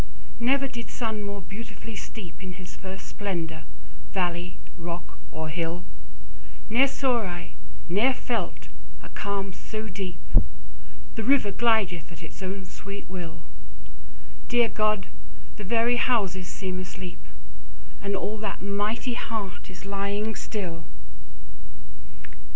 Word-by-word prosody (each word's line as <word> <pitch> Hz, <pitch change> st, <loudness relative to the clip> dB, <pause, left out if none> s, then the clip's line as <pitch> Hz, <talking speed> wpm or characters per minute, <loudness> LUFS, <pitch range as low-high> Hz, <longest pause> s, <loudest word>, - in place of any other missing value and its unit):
Never 275 Hz, +3 st, +5 dB
did 235 Hz, -3 st, -5 dB
sun 220 Hz, -3 st, 0 dB
more 200 Hz, -1 st, -2 dB
beautifully 220 Hz, +3 st, -6 dB
steep 200 Hz, -3 st, -6 dB
In 185 Hz, -1 st, -4 dB
his 180 Hz, 0 st, -8 dB
first 190 Hz, 0 st, -6 dB
splendour, 170 Hz, -6 st, -2 dB, 0.5 s
valley, 180 Hz, -1 st, +1 dB, 0.2 s
rock, 175 Hz, 0 st, -4 dB
or 160 Hz, +1 st, -2 dB
hill; 165 Hz, +2 st, 0 dB, 0.8 s
10 225 Hz, -, +1 dB
Ne'er 275 Hz, -, +10 dB
saw 260 Hz, -3 st, +3 dB
I, 175 Hz, -3 st, -3 dB, 0.3 s
never 220 Hz, +9 st, +5 dB
felt, 235 Hz, -2 st, 0 dB, 0.4 s
a -, -, -8 dB
calm 200 Hz, -1 st, -1 dB
so 215 Hz, +4 st, -4 dB
deep! 185 Hz, -3 st, -3 dB, 0.9 s
The 225 Hz, -, -1 dB
river 255 Hz, -4 st, +6 dB
glideth 200 Hz, -7 st, +4 dB
at 170 Hz, -, -9 dB
his 165 Hz, +3 st, -9 dB
own 190 Hz, 0 st, -2 dB
sweet 200 Hz, +2 st, -6 dB
will: 170 Hz, -3 st, -4 dB, 1.0 s
Dear 240 Hz, -2 st, +6 dB
God! 215 Hz, -2 st, +3 dB, 0.5 s
the 210 Hz, -, -4 dB
very 235 Hz, +4 st, +5 dB
houses 195 Hz, -8 st, +3 dB
seem 185 Hz, -1 st, -2 dB
asleep; 185 Hz, 0 st, -5 dB, 0.8 s
And 200 Hz, 0 st, +1 dB
all 210 Hz, +3 st, 0 dB
that 210 Hz, -2 st, -1 dB
mighty 205 Hz, +5 st, +1 dB
heart 205 Hz, -7 st, -2 dB
is 185 Hz, 0 st, -9 dB
lying 200 Hz, +2 st, +1 dB
still! 180 Hz, -7 st, -2 dB
200 Hz, 125 wpm, -29 LUFS, 180-220 Hz, 1.0 s, Ne'er